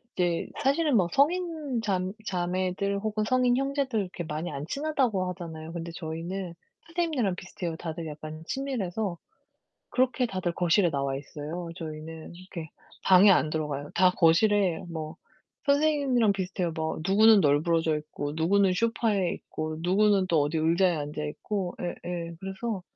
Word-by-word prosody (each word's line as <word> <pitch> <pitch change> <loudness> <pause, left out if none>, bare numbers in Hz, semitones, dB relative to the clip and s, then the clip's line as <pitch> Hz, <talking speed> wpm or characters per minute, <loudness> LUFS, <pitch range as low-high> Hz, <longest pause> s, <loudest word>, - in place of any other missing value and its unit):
이제 175 -2 0 0.2
사실은 280 0 +3
뭐 180 -4 +3
성인 310 -5 +1
잠 190 -3 -1
자매들 185 +2 -1
혹은 215 0 -1
성인 250 0 +3
형제들 275 -4 0
이렇게 180 -3 -4
많이 155 +2 -4
안 140 +1 -5
친하다고 255 - 0
하잖아요. 165 -2 -7
근데 170 0 -5
저희는 170 +2 -5 0.3
선생님네랑 315 - 0
비슷해요 175 -2 -5
다들 165 -1 -5
약간 155 +1 -8
친밀해서. 220 -9 -2 0.8
그렇게 255 0 +2
다들 185 -6 -2
거실에 175 +1 +3
나와 140 -2 -1
있어요, 155 +4 -6
저희는. 160 0 -7
이렇게 175 -3 -8 0.3
방에 195 +2 +7
안 155 -4 +4
들어가요. 150 -2 -3
다 185 0 +5
거실에 180 +1 +4
뭐 155 -2 -6 0.5
선생님이랑 280 -7 +3
비슷해요. 185 -3 -2
뭐 160 0 -2
누구는 215 +2 +6
널브러져 155 +2 +2
있고 145 -1 -5
누구는 190 +4 +3
소파에 210 -3 +1
있고 155 0 -5
누구는 195 +1 +3
또 160 -3 +3
어디 145 +3 0
의자에 170 +2 +3
앉아 150 +1 -4
있고. 180 +4 -3
예예. 175 -1 -5
그래서 195 +1 -4
180 Hz, 340 characters per minute, -28 LUFS, 160-215 Hz, 0.8 s, 방에